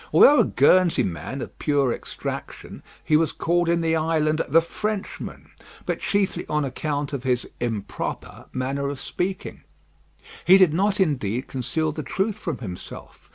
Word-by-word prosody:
Although 290 +1 +7
a - - +7
Guernsey 175 +5 +4
man 110 +10 -4
of - - -11
pure 140 -5 +2
extraction, - - -7 0.2
he 155 - +3
was 155 -1 +3
called 175 0 0
in 170 0 +2
the 165 0 +1
island 155 -1 +1
"the 160 +5 +6
Frenchman;" 210 +5 -5 0.3
but - - -2
chiefly 200 -2 0
on 150 -1 +1
account 145 +2 -3
of 140 - -2
his 125 -1 0
"improper" 115 -5 -4
manner 135 +2 -2
of 140 -1 -5
speaking. 185 +1 -4 0.8
He 185 +2 +7
did 185 -5 +5
not 195 +4 +1
indeed 130 - 0
conceal 155 +5 -1
the 155 - -5
truth 205 +6 -2
from 165 -9 -3
himself. 95 -7 -9
155 Hz, 155 wpm, -24 LUFS, 135-175 Hz, 0.8 s, Although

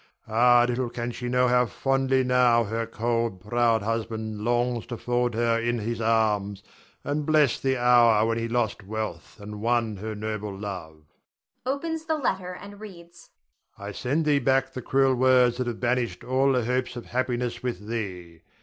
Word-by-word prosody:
Ah, 120 +2 +5
little 125 0 -1
can 120 0 -4
she 120 +1 -5
know 125 0 +3
how 125 0 +3
fondly 135 +1 +1
now 125 -2 +4
her 115 +1 -3
cold, 115 -2 -1
proud 115 +2 +1
husband 110 -1 -3
longs 120 +1 0
to 120 - -5
fold 120 -1 -1
her 115 0 +1
in 120 +1 0
his 115 +1 -3
arms 105 -3 +1 0.4
and 145 +1 -2
bless 155 -1 +3
the 135 -1 0
hour 120 -3 +5
when 115 0 0
he 115 - -2
lost 115 -2 -1
wealth 110 +2 -6
and 105 0 -8
won 115 -2 0
her 110 +2 -5
noble 105 -1 -4
love. 90 -6 -7 0.6
[Opens 320 +4 -2
the 315 -1 0
letter 190 -9 -2
and 200 0 -11
reads.] 170 -5 -13 0.5
I 100 +1 -7
send 140 +9 -1
thee 145 -2 +3
back 135 -1 +1
the 130 - -5
cruel 135 +2 +2
words 125 -1 +4
that 125 -1 -2
have 120 -2 -4
banished 120 -6 -1
all 135 +2 +2
the 125 -3 +1
hopes 125 +1 -1
of 120 - -7
happiness 120 -1 -2
with 120 -6 -4
thee. 90 -7 -5
120 Hz, 175 wpm, -26 LUFS, 110-130 Hz, 0.6 s, Ah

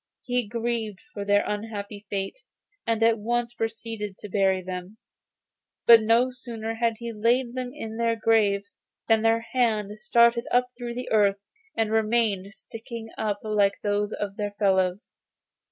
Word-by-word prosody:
He 245 -3 -1
grieved 230 -2 -2
for 205 - -4
their 205 0 +3
unhappy 210 -1 -5
fate, 195 - -3 0.5
and 225 -1 +1
at 225 -1 +4
once 240 +2 -1
proceeded 225 -3 -4
to 210 - -9
bury 190 -1 +2
them; 185 +3 -6 0.9
but 230 -1 +9
no 230 +4 +3
sooner 230 -3 -5
had 230 0 0
he 235 0 -6
laid 235 +3 +1
them 255 -1 -4
in 225 -6 -7
their 230 0 +1
graves, 205 -3 +1 0.3
than 225 -1 +4
their 225 0 +3
hands 215 -3 -1
started 235 +1 +4
up 250 0 +3
through 240 -1 -6
the 250 0 -5
earth 205 -2 +4 0.4
and 220 -1 +1
remained 215 -3 +1
sticking 225 +1 -9
up 205 -2 -2
like 205 -2 +2
those 205 0 0
of 200 -2 -4
their 205 -1 -3
fellows. 190 -2 +1
220 Hz, 155 wpm, -26 LUFS, 205-235 Hz, 0.9 s, but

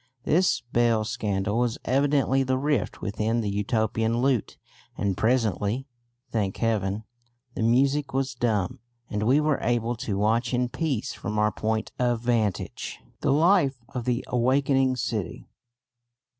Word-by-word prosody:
This 180 +6 +2
bell 115 -2 +3
scandal 105 -1 -1
was 120 -2 0
evidently 135 0 +2
the 130 0 +1
rift 140 -5 -1
within 110 +3 0
the 105 -2 -2
Utopian 110 +2 0
lute; 125 -2 0 0.4
and 100 -2 0
presently, 115 +1 +1 0.5
thank 100 -4 -1
heaven! 105 -2 0 0.5
the - - -4
music 135 +5 +2
was 135 0 -1
dumb, 110 -7 -1 0.3
and 105 - -1
we 125 +7 +4
were 150 -1 +1
able 120 0 0
to 110 -5 -3
watch 115 +4 +1
in 125 0 0
peace 135 -5 -2
from 105 +1 -4
our 105 0 +3
point 110 +2 -2
of 120 -2 +1
vantage 115 -5 -1 0.2
the - - +1
life 155 -2 +4
of 125 -4 -5
the 125 0 0
awakening 130 +1 +2
city. 110 -6 -3
120 Hz, 140 wpm, -26 LUFS, 110-130 Hz, 0.5 s, we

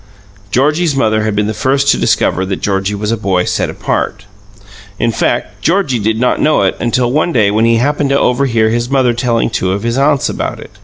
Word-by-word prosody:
Georgie's 150 - +1
mother 110 -4 +1
had 110 -1 -1
been 105 0 +1
the 110 - -2
first 135 +4 0
to - - +5
discover 95 - +1
that 95 0 -2
Georgie 100 0 -1
was 105 +2 -3
a - - +1
boy 95 -4 0
set - - -1
apart. 100 -2 -3 0.7
In 115 - 0
fact, - - -2
Georgie 165 -8 +1
did 110 +1 -1
not 125 - +1
know 155 -8 +2
it 95 - +1
until 120 +1 0
one 155 +5 +1
day 110 -8 +2
when 110 +2 +2
he 115 0 +3
happened 145 +3 0
to 140 0 +2
overhear 120 -3 +1
his 120 +1 -1
mother 130 -3 +2
telling 120 -1 0
two 95 -4 -1
of 100 +2 -3
his 115 +3 -1
aunts 140 -1 +2
about - - -4
it. - - -12
115 Hz, 215 wpm, -14 LUFS, 105-135 Hz, 0.7 s, to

